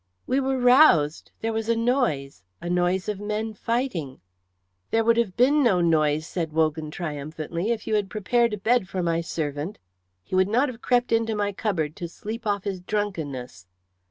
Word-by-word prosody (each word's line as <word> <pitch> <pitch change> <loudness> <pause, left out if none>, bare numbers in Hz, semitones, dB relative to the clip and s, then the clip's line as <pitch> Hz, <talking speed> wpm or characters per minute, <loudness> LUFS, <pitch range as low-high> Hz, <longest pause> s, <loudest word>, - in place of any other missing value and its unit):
"We 260 - +1
were 265 0 0
roused 245 - +5
there 225 0 -1
was 225 0 -2
a 230 - +3
noise 225 - 0 0.2
a 175 - -4
noise 180 +1 +1
of 210 -2 -2
men 215 +1 -3
fighting." 210 - -2 0.7
"There 225 0 +2
would 230 +1 +3
have 215 -6 0
been 280 +5 +4
no 220 -9 +3
noise," 155 -2 +2
said 165 -3 -4
Wogan, 155 -1 0
triumphantly, 155 +4 -4
"if 230 -3 -1
you - - -2
had 205 -2 +1
prepared 235 +3 +1
a - - -10
bed 220 -1 +1
for 185 0 -2
my 165 -1 +1
servant. 155 +2 -4 0.5
He - - -13
would 185 +1 +3
not 250 +6 +2
have 240 -2 -9
crept 245 -1 +1
into 225 -1 +1
my 205 -1 0
cupboard 170 -7 -2
to 175 - -4
sleep 220 +6 -7
off 200 -2 0
his 195 -3 -4
drunkenness." 160 - -4
200 Hz, 185 wpm, -25 LUFS, 160-230 Hz, 0.7 s, roused